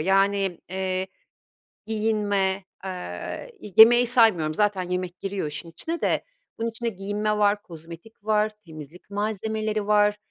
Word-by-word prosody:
Yani, 195 +1 +2
eee, 185 0 -2 0.8
giyinme, 205 -3 0 0.2
eee, 180 - -6
i 205 - -10
yemeği 240 +2 +8
saymıyorum 220 - +4
zaten 205 0 +1
yemek 180 0 -4
giriyor 195 -4 -3
işin 150 +3 -5
içine 325 - -4
de. - - 0 0.3
Bunun 230 +1 -1
içinde 230 +1 -3
giyinme 210 +1 -2
var, 205 0 +2
kozmetik 170 +6 -12
var, 215 0 +2 0.2
temizlik 155 +3 -12
malzemeleri 215 +1 -2
var, 210 0 +4
200 Hz, 130 wpm, -25 LUFS, 185-215 Hz, 0.8 s, yemeği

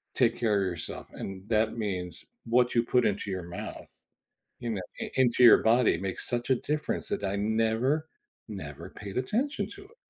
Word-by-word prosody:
take 120 -2 +3
care 110 -3 +2
of - - +1
yourself, 85 -3 -5
and 95 0 -7
that 110 0 +2
means 90 -6 -4 0.2
what 120 +1 +3
you 115 - +5
put 125 +1 +2
into 100 0 0
your 95 -2 -3
mouth, 85 +1 -7 0.7
you 120 - -3
know 105 -4 -2 0.2
i - - -4
into 125 -1 +3
your 120 - +10
body 115 -3 +3
makes 95 0 -4
such 120 -1 -2
a - - +7
difference 150 +4 -2
that - - -2
I 100 +1 0
never, 115 +8 +1 0.4
never 85 -4 -7
paid 100 +1 -6
attention 250 - -1
to - - -11
it. 470 - -19
110 Hz, 185 wpm, -29 LUFS, 95-125 Hz, 0.7 s, your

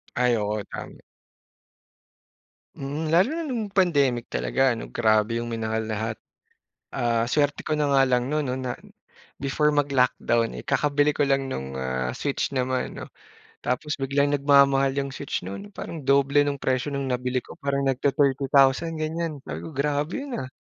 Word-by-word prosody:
Ay 125 -1 +3
oo, 105 0 -2
tama. - - -9 1.7
Hmm. 145 +4 -4
Lalo 185 +9 +5
na 330 - -3
no'ng 230 -7 -3
pandemic 145 -11 +2
talaga, 60 - +2
'no, 115 - -7
grabe 110 0 +2
'yong 120 - -3
minahal 110 -1 -2
lahat. 110 +1 -3 0.8
Ah, 115 -1 +1
suwerte 145 +3 0
ko - - -2
na 150 -1 +1
nga 135 -1 +5
lang 125 0 +1
no'n, 150 0 0
'no, 125 - -2
na 125 -1 -3 0.6
before 150 +2 +1
mag-lockdown, 125 -4 +1
eh, - - -7
kakabili 145 0 +2
ko 145 -1 0
lang 135 -1 +1
no'ng, 65 - -4
ah, 65 -1 -2
Switch 140 -1 -1
naman, 130 0 -1
'no. - - -8 0.5
Tapos 145 +4 -2
biglang 140 +1 +1
nagmamahal 140 -1 +4
'yong 140 -1 -2
Switch 135 -5 -4
no'n 100 +2 -8
parang 165 - -6
doble 140 +1 +4
no'ng 140 -1 -3
presyo 130 +2 0
no'ng 140 -1 -2
nabili 125 0 -1
ko, - - -13
parang 140 0 -1
nagti-thirty 135 +1 +1
thousand, 140 +5 +4
ganiyan. 155 -2 -3
Sabi - - -6
ko, - - -7
"Grabe 145 +3 -1
'yon, 275 -4 -5
ah." 130 - -4
135 Hz, 165 wpm, -25 LUFS, 120-145 Hz, 1.7 s, Lalo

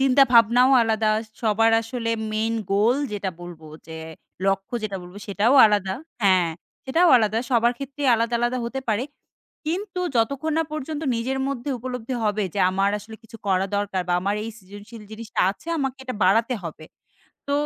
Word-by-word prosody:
চিন্তাভাবনাও 250 -2 +5
আলাদা। 220 -1 +1 0.3
সবার 225 +1 +3
আসলে 230 0 -4 0.2
মেইন 220 +1 0 0.2
গোল 220 +6 +3 0.2
যেটা 200 -2 -2
বলবো, 170 -3 -10 0.2
যে 160 0 -8 0.5
লক্ষ্য 195 +4 -1
যেটা 200 -2 -3
বলব 180 +2 -12
সেটাও 210 +6 +2
আলাদা 200 -2 0 0.3
হ্যাঁ, 185 -4 +4 0.3
সেটাও 335 +6 +3
আলাদা। 220 -1 +1
সবার 235 -1 +3
ক্ষেত্রেই 275 0 -3
আলাদা, 230 +1 0
আলাদা 240 +1 0
হতে 265 +3 -4
পারে। 220 +4 +1 0.6
কিন্তু 365 +3 -3 0.2
যতক্ষণ 280 +7 0
না 325 - +2
পর্যন্ত 310 +1 -4
নিজের 260 +3 -2
মধ্যে 275 +1 -4
উপলব্ধি 250 0 -5
হবে। 210 0 0
যে - - -2
আমার 195 +1 +1
আসলে 220 +2 -11
কিছু 225 0 -13
করা 190 0 +2
দরকার 200 -2 -1
বা - - +1
আমার 200 +2 0
এই 225 - -5
সৃজনশীল 205 +3 -12
জিনিসটা 220 0 -4
আছে। 205 - -13
আমাকে 270 -2 -2
এটা 255 - -4
বাড়াতে 225 +6 +3
হবে। 155 -1 -7 0.6
তো - - 0
225 Hz, 165 wpm, -23 LUFS, 200-255 Hz, 0.6 s, চিন্তাভাবনাও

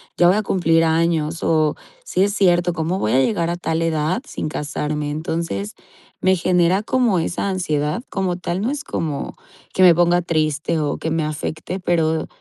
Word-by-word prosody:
ya 175 - +4
voy 195 - +3
a 215 - 0
cumplir 165 -4 +2
años 160 0 0
o 155 -2 +2 0.3
sí 185 - +1
es 200 0 +1
cierto, 175 -3 +3
¿cómo 165 +3 -2
voy 105 - 0
a 130 - +4
llegar 170 +3 +1
a 175 - -2
tal 165 -2 -2
edad 160 +4 0
sin - - -5
casarme?", 150 0 -3
entonces, 155 -10 -3 0.5
me 190 0 +4
genera 180 +2 +2
como 235 -5 +2
esa 175 +4 -2
ansiedad, 155 -3 -1
como 185 -3 -1
tal, 180 +1 -3
no 235 +6 0
es 295 +1 -4
como 150 - -4 0.4
que 185 - +3
me 175 -2 +8
ponga 175 +1 +3
triste 155 -1 0
o 145 -2 -1
que 160 - -3
me 160 0 0
afecte, 155 +4 -4
pero, 160 -2 +1
165 Hz, 185 wpm, -20 LUFS, 155-180 Hz, 0.5 s, me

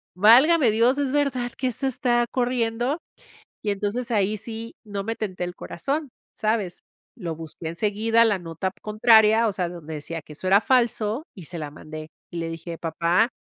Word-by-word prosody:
Válgame 245 - +6
Dios. 235 +5 +3
¿Es 275 -2 0
verdad 260 -4 0
que 255 - 0
eso 255 +3 -1
está 245 -2 +1
corriendo?", 245 +3 0 0.6
y 210 - 0
entonces, 210 +5 -2
ahí 210 0 +2
sí 225 +1 -7
no 200 -2 -4
me 225 +1 -3
tenté 185 -4 -3
el 175 0 -5
corazón, 280 - -3 0.2
¿sabes? 215 -5 -1 0.3
Lo 165 -3 -4
busqué 160 0 -7
enseguida, 215 +6 +2
la 205 -4 +2
nota 170 +2 -3
contraria, 220 +1 +5
o - - -1
sea, 180 -3 -1
donde 165 -3 -8
decía 160 +2 -5
que 150 - -12
eso 185 - -7
era 200 +2 +6
falso, 235 +1 +1
y 185 - -10
se 175 - -5
la 150 -2 -5
mandé, 155 +1 -9 0.2
y 175 - -8
le 165 0 -2
dije: 165 0 -7
"Papá, 170 +6 +2
215 Hz, 180 wpm, -24 LUFS, 175-240 Hz, 0.6 s, Válgame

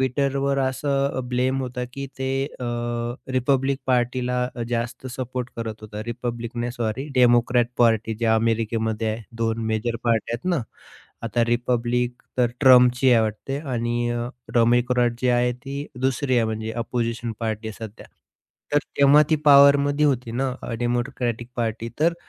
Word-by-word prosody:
Twitterवर 140 +1 0
असं 140 +1 0
अ, - - 0
ब्लेम 130 +2 +1
होतं, 125 0 -4
की 140 0 -5
ते 130 0 -2 0.3
अ, - - -3 0.7
रिपब्लिक 135 +1 +1
पार्टीला 125 0 +1
अ, 120 - -3
जास्त 120 +2 -3
सपोर्ट 125 0 -5
करत 110 -2 -5
होता. 105 0 -7
रिपब्लिक 120 0 -5
नाही 120 0 -2
सॉरी 120 +4 -3
डेमोक्रॅट 120 -1 +4
पार्टी 115 -1 +3
जे 115 - +1
अमेरिकेमध्ये 110 0 0
आहे 110 +1 -6 0.2
2 115 0 0
मेजर 115 +2 -1
पार्ट्या 115 0 +1
आहेत 120 - -7
ना. 130 - -1 0.6
आता 115 +1 0
रिपब्लिक 120 +1 0 0.3
तर 125 - +5
ट्रम्पची 125 -1 +6
आहे 115 - +5
वाटते 110 +6 -3
आणि 120 0 -1
अ, 120 0 -2 0.3
डेमोक्रॅट 120 +1 +3
जी 125 - +2
आहे 125 0 +2
ती 140 +4 -6
दुसरी 130 0 +1
आहे, 115 - +3
म्हणजे 110 0 -3
अपोझिशन 115 -1 -2
पार्टी 110 -1 -3
आहे 110 +1 -7
सध्या. 105 - -14 0.7
तर 145 - +5 0.2
तेव्हा 140 +2 +7
ती 155 - +4
पॉवरमध्ये 145 +1 +6
होती 125 -4 0
ना, 130 +3 0
अ, - - -5
डेमोक्रॅटिक 120 -1 -2
पार्टी. 115 -1 -2
तर 165 +2 +3
120 Hz, 155 wpm, -23 LUFS, 115-130 Hz, 0.7 s, तेव्हा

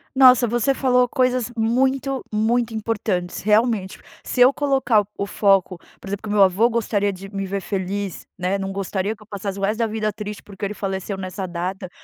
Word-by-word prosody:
Nossa, 255 -2 +7
você 240 +4 +1
falou 250 -2 +3
coisas 255 -2 +1
muito, 265 +4 +1
muito 225 +2 +1
importantes 205 -5 -2
realmente, 210 -2 +2 0.3
se 250 - -1
eu 255 +3 +7
colocar 265 -7 +2
o 200 - -1
foco, 195 -3 +2 0.2
por 195 - -9
exemplo, 200 +1 -4
que 215 - -6
meu 205 -1 +5
avô 195 +5 +4
gostaria 205 -3 0
de 195 +2 -10
me 195 0 -2
ver 195 +1 -3
feliz, 195 0 -4
né. 185 +2 0
Não 195 0 -4
gostaria 195 +2 -2
que 215 - -17
eu - - -24
passasse 200 -1 -5
o - - -6
resto 210 +3 0
da 230 - +2
vida 215 0 -1
triste 210 0 -7
porque 200 0 -6
ele 205 - -3
faleceu 195 0 -3
nessa 190 0 -5
data, 180 +2 -4
210 Hz, 195 wpm, -22 LUFS, 195-235 Hz, 0.3 s, Nossa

